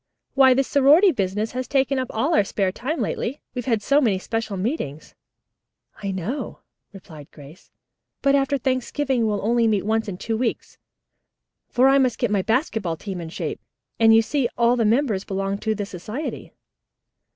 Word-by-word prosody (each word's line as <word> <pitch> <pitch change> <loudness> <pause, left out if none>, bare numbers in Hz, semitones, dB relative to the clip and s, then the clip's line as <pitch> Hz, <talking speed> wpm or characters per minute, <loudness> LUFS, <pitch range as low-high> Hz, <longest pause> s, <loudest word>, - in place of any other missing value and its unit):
"Why, 265 -2 +6
this 270 0 +1
sorority 300 +8 +5
business 210 - -2
has 255 0 -4
taken 275 -1 +1
up 255 - -2
all 280 +10 0
our 260 - +4
spare 195 -1 -1
time 275 - -3
lately. 270 +6 -3
We've 245 -1 -5
had 225 -4 +1
so 280 +5 +3
many 215 -8 +2
special 225 +1 -4
meetings." 185 - -4 0.9
"I 200 - -3
know 195 - -4 0.3
it," - - -19
replied 155 -6 -12
Grace, 145 +3 -15 0.5
"but 275 - +4
after 280 0 +2
Thanksgiving 260 -1 -1
we'll 205 -1 -2
only 235 0 +2
meet 210 -3 +1
once 220 +1 0
in 190 -3 -5
two 225 +3 -3
weeks, 240 -2 -3 0.9
for 255 +2 +3
I 275 +1 +5
must 255 -3 +1
get 240 -4 -1
my 200 -2 +2
basketball 220 - -1
team 190 -2 -6
in 165 - -7
shape, - - -5 0.4
and 225 -1 +6
you 225 0 +6
see 265 0 0
all 235 +1 +3
the 230 -2 +1
members 220 -3 +1
belong 195 0 -3
to 220 0 -1
the 205 -1 -3
society." 210 - -6
225 Hz, 180 wpm, -23 LUFS, 200-265 Hz, 0.9 s, Why